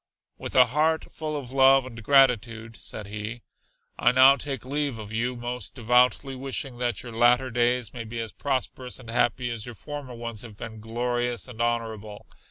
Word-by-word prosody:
"With - - -6
a 125 - +8
heart 155 +6 0
full 155 -1 -4
of 130 -4 -7
love 135 0 +5
and 115 -3 -9
gratitude," 115 -4 +3
said 105 - -6
he, 105 +3 -6 0.6
"I - - +5
now 130 +2 +7
take 135 -3 -5
leave 140 -2 -1
of 105 -1 -8
you, 120 +3 -1
most 120 +1 -5
devoutly 125 +2 +2
wishing 130 -1 -5
that 120 -3 -1
your 120 - -8
latter 120 +3 +3
days 120 0 +1
may 120 - -5
be 115 +1 -6
as 115 -1 -4
prosperous 130 -2 -3
and 115 -3 -9
happy 120 +1 +1
as 115 -1 -5
your 120 - -8
former 145 -1 -7
ones 115 -2 -6
have 110 -4 -11
been 110 0 -8
glorious 120 +2 -2
and 120 -2 -7
honorable. 110 -3 -2
120 Hz, 180 wpm, -26 LUFS, 115-130 Hz, 0.6 s, a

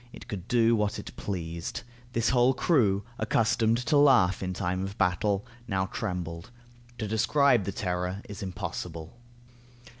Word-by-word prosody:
It - - -12
could 100 -5 -6
do 115 -1 +4
what 105 -1 0
it - - -8
pleased. 85 -4 -4 0.3
This 115 -1 +1
whole 125 +1 +4
crew, 110 - +2 0.2
accustomed 115 +1 +2
to 150 - +3
laugh 125 -11 +5
in 95 -1 -2
time 90 +1 -2
of 100 +1 -6
battle, 100 +2 +1 0.2
now 95 -3 0
trembled. 90 -3 -4 0.5
To 110 - -3
describe 120 +1 +3
the 100 - -2
terror 90 +1 -3
is 105 +2 -8
impossible. 90 -3 -5
100 Hz, 145 wpm, -28 LUFS, 90-115 Hz, 0.5 s, laugh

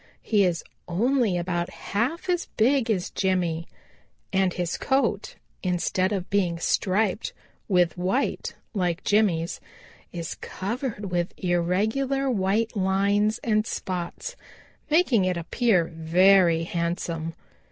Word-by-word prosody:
He 210 -3 +3
is 170 -3 0 0.2
only 225 +2 +2
about 175 0 -1
half 260 - -2
as 355 -1 0
big 250 +1 +3
as 190 -5 0
Jimmy, 175 -4 0 0.7
and 190 -1 +3
his 175 -1 -2
coat, 265 -7 0 0.3
instead 185 +1 0
of 190 -3 -2
being 185 -4 +1
striped 195 +4 0 0.3
with 180 -3 +2
white 190 +10 -1 0.2
like 180 -4 -1
Jimmy's, 185 -6 +1 0.5
is 170 -2 -4
covered 210 -1 -4
with 175 0 -1
irregular 220 +11 0
white 215 +2 0
lines 200 +2 +2
and 215 -1 +1
spots, 185 - -4 0.5
making 295 - +4
it 180 -1 0
appear 180 +1 +2
very 170 +1 +4
handsome. 170 -1 -3
190 Hz, 110 wpm, -25 LUFS, 175-220 Hz, 0.7 s, making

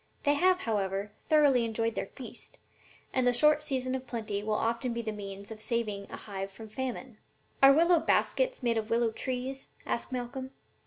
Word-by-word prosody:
They 290 - +4
have, 365 +5 +3
however, 200 -2 -1
thoroughly 290 -6 +4
enjoyed 225 0 0
their - - -3
feast, - - -10 0.6
and 255 -1 +2
the 245 - +5
short 300 +4 +5
season 260 -4 -1
of 260 -1 -4
plenty 215 -4 -3
will 215 0 -1
often 235 +3 0
be 235 0 -3
the 220 - -2
means 200 0 -7
of 215 -1 -8
saving 215 -4 -2
a - - -7
hive 195 -2 -5
from 220 +3 -11
famine.'" 255 -1 -5 0.4
"Are 270 0 +10
willow 335 +4 +5
baskets - - +1
made 230 -2 +2
of 220 0 -5
willow 230 0 +2
trees?" 260 +3 -4 0.2
asked 235 - -2
Malcolm. 260 +1 -4
235 Hz, 180 wpm, -30 LUFS, 215-265 Hz, 0.6 s, Are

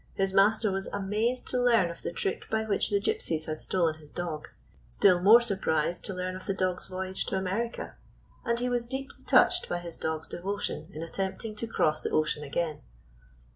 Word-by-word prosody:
His 195 0 +1
master 205 +2 +4
was 195 0 -2
amazed 210 +5 -1
to 250 - +1
learn 230 -8 +4
of 170 - -11
the - - -3
trick 190 - -3
by 220 0 +1
which 210 -1 +1
the 200 -2 +2
Gypsies 160 -5 -1
had 155 0 -4
stolen 165 -4 0
his 150 -1 -15
dog, 165 -4 -4 0.4
still 180 - +4
more 220 +6 +8
surprised 175 -7 0
to 195 - -3
learn 185 0 -3
of 185 - -9
the 195 - 0
dog's 185 -1 -1
voyage 190 0 -2
to 190 - 0
America, 195 +6 -3 0.5
and 235 -1 0
he 250 - 0
was 240 -1 0
deeply 265 +2 -6
touched 355 -1 +4
by 175 - 0
his 175 -1 -7
dog's 160 0 -3
devotion 185 -3 -4
in 155 -1 -6
attempting 195 +5 -4
to 230 - -3
cross 155 -8 +1
the - - -2
ocean 150 -1 +1
again. 150 +1 -2
190 Hz, 195 wpm, -29 LUFS, 170-220 Hz, 0.5 s, more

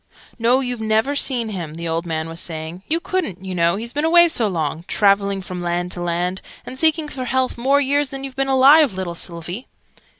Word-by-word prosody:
"No, 245 +3 +3
you've 245 -3 -4
never 220 +6 +1
seen 250 -5 0
him," 170 -7 -6
the 170 0 -5
old 165 +1 -2
man 160 -1 -2
was 165 +1 -5
saying: 160 +2 -6
"you 325 +2 +1
couldn't, 320 - -3
you 190 - -4
know, 170 0 +2
he's 230 +3 -6
been 295 - -1
away 345 +1 +6
so 240 -9 +1
long 160 -3 -3
traveling 200 -1 +2
from 180 0 -6
land 175 +1 -2
to 175 - -4
land, 175 +2 -2 0.2
and 260 - -8
seeking 315 0 +3
for 260 -3 -6
health, 260 +1 0
more 270 +4 +2
years 285 0 +1
than 270 -1 -7
you've 270 -2 -7
been 270 0 -1
alive, 270 0 +6
little 185 -2 -4
Sylvie!" 175 +6 -5
215 Hz, 210 wpm, -20 LUFS, 175-270 Hz, 0.2 s, away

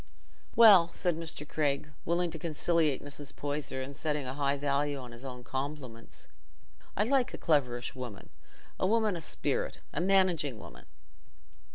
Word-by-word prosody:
"Well," 205 -7 +9
said 175 -2 0
Mr. 160 -2 -5
Craig, 150 0 -1
willing 170 +1 +1
to 160 - -6
conciliate 160 -2 +1
Mrs. 145 0 -6
Poyser 145 -2 -3
and 140 +1 -8
setting 150 -1 -1
a 130 - -3
high 140 0 0
value 145 0 0
on 125 -3 -8
his 120 +2 -11
own 125 -2 -7
compliments, 130 -3 -6 0.7
"I 205 - +4
like 260 +2 +1
a - - -8
cleverish 125 -6 +1
woman—a 125 - -7
woman 220 -2 +2
o' - - -4
sperrit—a 160 -1 -3
managing 180 - +3
woman." - - -12
145 Hz, 145 wpm, -31 LUFS, 135-170 Hz, 0.7 s, Well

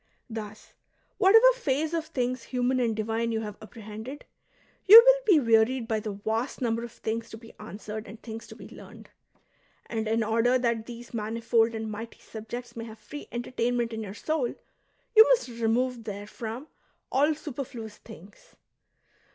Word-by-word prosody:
Thus, 215 -1 -8 0.5
whatever 430 +4 +7
phase 310 - -1
of 325 -2 -2
things 255 -5 -2
human 255 0 0
and 230 -3 +1
divme 225 +2 -1
you 220 -1 -1
have 210 -2 -6
apprehended, 220 +5 -9 0.6
you 435 +4 +13
Avill - - +5
be 365 -7 +7
wearied 230 0 +3
by 220 -1 0
the 215 -1 -5
vast 220 +5 -3
number 230 -2 -1
of 235 - -7
things 225 0 -4
to 220 - -9
be 225 0 -14
answered 210 +1 -7
and 215 +3 -10
things 225 -1 -8
to - - -11
be - - -11
learned. - - -13 0.7
And 220 -1 -3
in 225 +1 +1
order 230 +3 +2
that 235 -3 -1
these 240 0 -10
manifold 230 +1 +1
and 220 -1 -4
mighty 225 +2 -7
subjects 235 +2 -8
may 230 -1 -6
have 220 -1 -10
free 215 +8 -10
enter 240 +1 -5
tainment 240 -1 0
in 220 - -4
your 205 -2 -7
soul, 300 -2 -1 0.6
you 440 - +11
must - - +3
remove 235 +1 0
therefrom 220 +4 -6 0.5
all 295 +3 +3
superfluous 245 -7 -7
things. 185 +6 -15
230 Hz, 165 wpm, -27 LUFS, 220-255 Hz, 0.7 s, you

